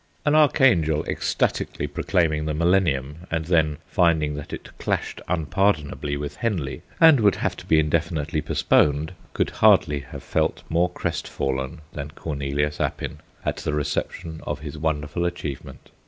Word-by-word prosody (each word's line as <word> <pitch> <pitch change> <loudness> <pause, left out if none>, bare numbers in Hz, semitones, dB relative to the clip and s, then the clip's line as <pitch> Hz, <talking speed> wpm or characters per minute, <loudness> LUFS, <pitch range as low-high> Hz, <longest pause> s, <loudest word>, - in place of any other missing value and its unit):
An 150 - +3
archangel 100 - +4
ecstatically - - -1
proclaiming 80 -5 0
the 75 -1 -1
Millennium, 85 -2 +1
and 80 -1 -1
then 80 -3 +2
finding 80 -5 +2
that 75 0 -7
it - - -8
clashed - - -2
unpardonably 75 -3 0
with 70 0 -5
Henley 95 - -2 0.2
and 160 -5 +8
would 105 -3 +4
have - - -1
to - - -11
be 80 - +4
indefinitely 80 0 0
postponed, 75 +2 +2 0.2
could - - 0
hardly 75 -1 +4
have 70 - -10
felt - - 0
more 85 +2 +2
crestfallen 65 -5 -3
than 70 0 -5
Cornelius 75 0 -2
Appin - - -3 0.3
at - - -1
the 75 - -3
reception 80 +2 -3
of 75 - -4
his 75 -1 -6
wonderful 75 +2 -1
achievement. 85 -5 -5
80 Hz, 140 wpm, -24 LUFS, 75-85 Hz, 0.3 s, and